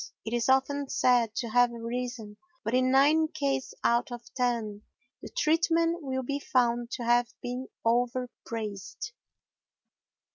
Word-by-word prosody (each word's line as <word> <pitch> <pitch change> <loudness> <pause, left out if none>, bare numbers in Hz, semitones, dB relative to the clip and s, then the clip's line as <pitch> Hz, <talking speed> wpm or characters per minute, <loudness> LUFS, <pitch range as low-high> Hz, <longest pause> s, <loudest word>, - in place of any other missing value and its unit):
It 225 - -4
is 240 0 +1
often 270 +1 +2
said 240 -3 +3
to 235 - -2
have 245 +1 +4
arisen, 235 -2 -5 0.3
but 225 - -2
in 255 0 +3
nine 295 +4 +5
cases 275 -3 -2
out 235 +2 +2
of 240 -1 -9
ten 230 -5 -1 0.4
the - - -8
treatment 335 -3 +2
will 260 -2 -2
be 280 +3 -2
found 240 -4 +1
to 245 - -3
have 240 0 +3
been 250 +1 -4 0.2
overpraised. 235 - -2
245 Hz, 135 wpm, -29 LUFS, 235-270 Hz, 0.4 s, nine